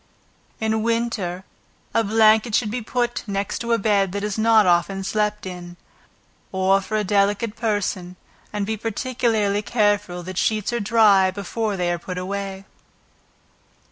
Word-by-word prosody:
In 220 0 0
winter 225 -6 -1 0.5
a 230 - +3
blanket 220 +1 +4
should 215 -4 +1
be 245 +2 -3
put 240 +2 -1
next 200 +3 -3
a 235 0 +1
bed 200 -3 +1
that 200 0 -3
is 210 -1 -2
not 220 -1 +4
often 185 +2 +2
slept 210 +1 -1
in, 175 -1 -8 0.7
or 190 +1 +2
for 215 +3 -3
a 210 - 0
delicate 205 +3 +1
person, 200 -5 -2 0.4
and 205 -1 -2
be 220 +1 -2
particularly 225 -2 0
careful, 205 -5 0
that 185 +1 -4
sheets 215 +1 0
are 240 - 0
dry 205 -3 +4
before 200 +2 -3
they 175 -1 0
are 175 - -2
put 180 +1 -6
away. 195 +1 -4
205 Hz, 145 wpm, -22 LUFS, 190-220 Hz, 0.7 s, blanket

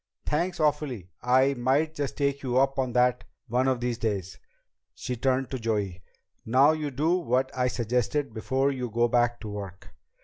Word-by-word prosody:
"Thanks 175 +4 -1
awfully. 145 - -1
I 130 +3 +4
might 135 +5 +1
just 145 -3 -4
take 140 -1 0
you 125 -2 -1
up 135 +1 +2
on 130 -2 -1
that 125 0 +2 0.2
one 125 +3 +1
of 130 -2 +1
these 120 -1 -2
days." 100 -4 -3 0.6
She 125 - -4
turned 130 +2 0
to 130 - -3
Joey. 105 -6 -2 0.4
"Now 130 +6 +5
you 155 -2 -2
do 150 +6 +1
what 130 -5 0
I 125 -1 +1
suggested 125 +2 -1
before 135 +5 0
you 125 -3 -4
go 120 +2 +2
back 120 0 +1
to 110 - -6
work." 100 -2 -8
125 Hz, 175 wpm, -27 LUFS, 120-140 Hz, 0.6 s, Now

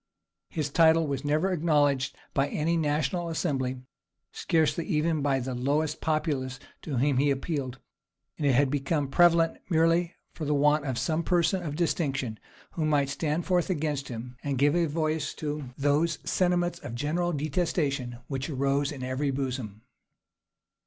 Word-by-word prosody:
His 150 -3 -3
title 165 +1 +5
was 140 -2 -3
never 155 +6 +1
acknowledged 145 -6 +2 0.2
by 135 0 +2
any 160 +4 0
national 155 +2 0
assembly, 130 -6 -2 0.5
scarcely 165 0 +1
even 155 -2 +1
by 140 -1 +1
the 130 0 -4
lowest 145 +5 0
populace 145 -4 -1 0.2
to 145 -5 -4
whom 135 +2 +2
he 145 +2 +3
appealed; 135 -2 -2 0.6
and 145 - +1
it 135 - +4
had 135 0 +3
become 145 0 0
prevalent 170 +1 +4
merely 165 +1 +2 0.2
for 150 -3 -3
want 150 0 +3
of 130 -3 -2
some 155 +6 0
person 175 +2 +1
of 150 -4 -4
distinction, 140 -8 -1 0.3
who 160 - -3
might 145 -3 +2
stand 155 +3 -1
forth 180 -2 +1
against 150 -5 -1
him, 125 +1 -7
and 140 -2 -1
give 145 +4 +3
a 170 -1 +2
voice 155 -1 -1
to 150 -1 -4
those 145 +3 +2
sentiments 175 -1 +1
of 120 - -7
general 165 +7 0
detestation 145 -5 -1
which 135 0 -3
arose 140 0 0
in 135 -3 -6
every 130 +3 -1
bosom. 130 -6 -4
145 Hz, 150 wpm, -28 LUFS, 135-165 Hz, 0.6 s, title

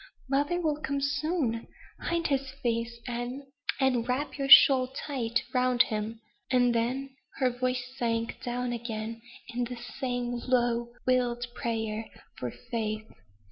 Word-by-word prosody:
"Mother 290 +6 +1
will 305 -3 0
come 280 -1 -1
soon. 280 -4 0 0.3
Hide 335 -1 -1
his 275 -2 +1
face, 230 0 0
Anne, 245 +3 -3 0.4
and 250 -3 +2
wrap 275 +4 -1
your 275 -1 -2
shawl 265 -1 +9
tight 255 -3 -2
round 250 -1 +4
him." 215 +1 -3 0.3
And 245 -2 +4
then 260 +4 -1 0.2
her 255 -2 +2
voice 250 0 -1
sank 230 -2 -1
down 245 0 -2
again 230 -1 -4 0.3
in 245 0 -1
the 245 +1 -5
same 245 0 -3
low, 240 -2 +2
wild 245 -1 +2
prayer 220 -2 -2 0.3
for - - -2
faith. 215 -2 -3
245 Hz, 135 wpm, -29 LUFS, 235-265 Hz, 0.4 s, shawl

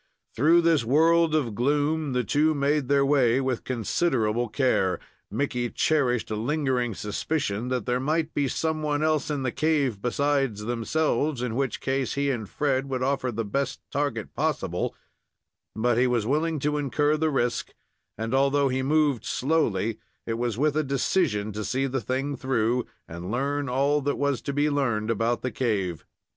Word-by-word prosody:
Through 160 +7 +5
this 165 -5 +3
world 160 +5 +4
of 130 -8 0
gloom 145 +4 0
the 125 0 +1
two 150 +8 +2
made 145 -1 +1
their 140 0 +3
way 135 -3 +3
with 130 -3 -1
considerable 120 -2 0
care. 110 -8 +1 0.3
Mickey 125 -4 -1
cherished 125 -8 +1
a - - 0
lingering 125 -1 0
suspicion 105 +1 -2
that 125 -3 -2
there 125 0 0
might 155 +4 -1
be 140 -1 +1
some 160 +4 -1
one 150 0 0
else 155 -1 +1
in 145 -3 -2
the 125 - 0
cave 140 -8 0
besides 135 -2 0
themselves, 125 +4 0
in 125 -3 -2
which 135 -3 -1
case 135 0 -1
he 140 0 +1
and 110 -6 -4
Fred 135 -2 0
would 130 -1 -1
offer 130 -1 0
the 115 0 -3
best 135 +5 -2
target 140 -6 -2
possible; - - -1 0.8
but 120 +2 +1
he 125 - +4
was 120 -3 +1
willing 155 +5 0
to 150 +1 0
incur 145 +2 +1
the 160 +1 +1
risk, 125 -4 -1 0.5
and, 115 +3 -3
although 140 +1 +3
he 130 +1 0
moved 145 -2 +2
slowly, 115 -8 0 0.3
it 115 0 -3
was 120 -3 -1
with 150 +2 +1
a 155 - +2
decision 135 - 0
to 105 +1 -4
see 130 +6 0
the 135 -1 -2
thing 130 +5 -2
through, 125 -2 0 0.2
and 85 +2 -7
learn 140 +4 -1
all 140 +3 +2
that 145 +1 -1
was 140 -4 0
to 140 - -3
be 145 +2 +1
learned 115 -7 0
about 115 +1 0
the 130 - -1
cave. 100 - -2
135 Hz, 175 wpm, -26 LUFS, 120-145 Hz, 0.8 s, Through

